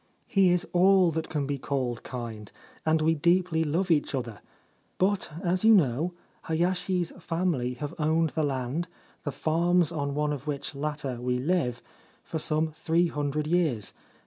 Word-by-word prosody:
He 195 -2 +3
is 175 0 +1
all 185 0 +5
that 160 0 -3
can 150 -3 -1
be 140 0 -3
called 125 -4 -2
kind, 115 -5 -7 0.4
and 155 0 +3
we 160 +1 +4
deeply 170 +1 +2
love 170 +4 0
each 150 -2 +2
other; 120 -5 -5 0.6
but, 200 +3 +1
as 180 +1 0
you 225 0 +8
know, 155 - +2 0.3
Hayashi's 175 +1 0
family 165 -8 -1
have 145 +2 -5
owned 160 +1 +2
the 160 - -1
land, 140 +3 -1 0.4
the - - -1
farms 170 +1 +2
on 140 -2 -2
one 150 0 0
of 140 0 -7
which 145 0 -3
latter 140 -3 -3
we 125 0 0
live, 125 -4 0 0.4
for 160 - -4
some 155 +1 +1
three 165 +3 +1
hundred 150 0 -2
years. 155 - 0
155 Hz, 160 wpm, -27 LUFS, 140-175 Hz, 0.6 s, you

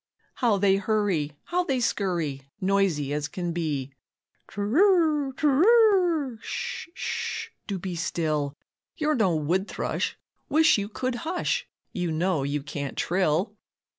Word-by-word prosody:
How 230 -5 +2
they 195 0 +4
hurry, 200 -8 0
how 360 +1 0
they 270 -6 0
scurry, 175 - -1 0.2
Noisy 185 -8 +1
as 150 0 -1
can 175 +2 -4
be. 150 -6 -2 0.6
"Tr'r, 300 - +3
tr'r, 340 - +4
sh, - - -4
sh, - - -3 0.2
do 200 - -2
be 185 0 -5
still, 155 -4 -1 0.4
You're 305 -1 +1
no 195 - +2
wood 175 +6 0
thrush, - - -2 0.3
wish 310 -6 +5
you 200 0 -3
could 255 +3 -2
hush, 345 +2 -1 0.3
You 175 -2 -1
know 165 0 +1
you 140 +1 -2
can't 140 -1 -5
trill." 180 +3 +1
195 Hz, 130 wpm, -26 LUFS, -, 0.6 s, wish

